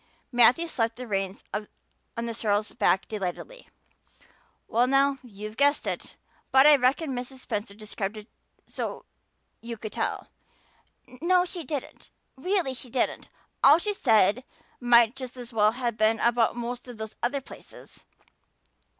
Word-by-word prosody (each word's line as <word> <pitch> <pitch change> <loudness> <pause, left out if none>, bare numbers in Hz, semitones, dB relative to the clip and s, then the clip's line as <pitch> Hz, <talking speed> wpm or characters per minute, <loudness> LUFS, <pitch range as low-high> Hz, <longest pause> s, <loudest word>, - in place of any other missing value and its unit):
Matthew 245 +6 +5
slapped 230 -7 -1
the 250 - -7
reins 195 -3 -3
on 210 0 -3 0.6
the 230 - -3
sorrel's 210 -1 -1
back 190 -4 +2
delightedly. 215 - -6 1.0
"Well 240 +2 +2
now, 275 +1 +3
you've 215 -2 -9
guessed 285 +1 +3
it! - - -4 0.4
But 265 +1 +6
I 300 0 +9
reckon 270 +4 +1
Mrs. 250 +1 -5
Spencer 205 -4 -4
described 210 -1 -5
it 210 0 -10 0.4
so's - - -5 0.6
you 235 0 -6
could 215 0 -7
tell." - - -3 0.8
"No, 345 +9 +1
she 350 -1 -6
didn't 285 -1 -6 0.3
really 350 0 -1
she 250 0 -7
didn't. 245 +1 -2 0.3
All 285 +3 +8
she 415 +4 -1
said 225 - +3 0.4
might 240 -1 +5
just 255 -1 -8
as 245 -1 -9
well 215 0 +3
have 240 -3 -3
been 220 +1 +2
about 235 -1 +2
most 240 +1 -5
of 245 -2 -9
those 220 0 -7
other 270 +4 0
places. 270 - -14
240 Hz, 145 wpm, -27 LUFS, 215-270 Hz, 1.0 s, I